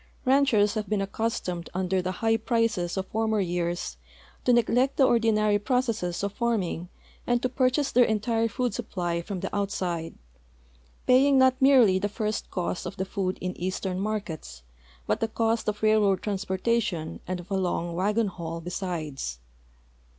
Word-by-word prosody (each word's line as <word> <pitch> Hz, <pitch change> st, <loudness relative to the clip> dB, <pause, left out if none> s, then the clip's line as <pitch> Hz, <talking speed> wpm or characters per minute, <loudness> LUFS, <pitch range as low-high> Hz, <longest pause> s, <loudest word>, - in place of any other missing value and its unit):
Ranchers 255 Hz, -6 st, +4 dB
have 215 Hz, -2 st, -3 dB
been 210 Hz, -1 st, +1 dB
accustomed 195 Hz, -4 st, -2 dB
under 185 Hz, 0 st, 0 dB
the 185 Hz, +1 st, -2 dB
high 225 Hz, 0 st, +4 dB
prices 220 Hz, -6 st, 0 dB
of 190 Hz, -, -1 dB
former 220 Hz, 0 st, 0 dB
years 175 Hz, -, -2 dB, 0.5 s
to -, -, +4 dB
neglect 245 Hz, +3 st, +3 dB
the 275 Hz, -, +5 dB
ordinary 215 Hz, -3 st, +3 dB
proce.sses 225 Hz, -7 st, -1 dB
of 200 Hz, 0 st, -2 dB
farming 200 Hz, -8 st, -1 dB, 0.4 s
and 240 Hz, 0 st, +3 dB
to -, -, +3 dB
purchase 255 Hz, +2 st, +1 dB
their 245 Hz, -, +6 dB
entire 225 Hz, +1 st, +1 dB
food 245 Hz, +2 st, -1 dB
sui)[>ly 175 Hz, -6 st, -3 dB
from 190 Hz, -1 st, -5 dB
the -, -, -4 dB
outside, 180 Hz, -5 st, -2 dB, 0.9 s
paying 270 Hz, +2 st, +5 dB
not 260 Hz, 0 st, +4 dB
merely 250 Hz, -9 st, +6 dB
the 205 Hz, +2 st, -1 dB
first 215 Hz, +1 st, -3 dB
cost 180 Hz, -1 st, -3 dB
of 200 Hz, -, -7 dB
the 190 Hz, -, -1 dB
food 190 Hz, -1 st, -2 dB
in 180 Hz, 0 st, -3 dB
eastern 185 Hz, +1 st, -3 dB
markets, 190 Hz, -, -4 dB, 0.4 s
but -, -, 0 dB
the 225 Hz, -, 0 dB
cost 225 Hz, 0 st, 0 dB
of 210 Hz, 0 st, -2 dB
railroad 210 Hz, -3 st, +3 dB
transportation 195 Hz, -3 st, -1 dB
and 185 Hz, 0 st, -2 dB
of 175 Hz, +3 st, -12 dB
a -, -, +1 dB
long 175 Hz, -2 st, -1 dB
wagon 210 Hz, +6 st, +1 dB
haul 170 Hz, -4 st, -5 dB
besides. 165 Hz, -, -4 dB
205 Hz, 160 wpm, -27 LUFS, 180-230 Hz, 0.9 s, their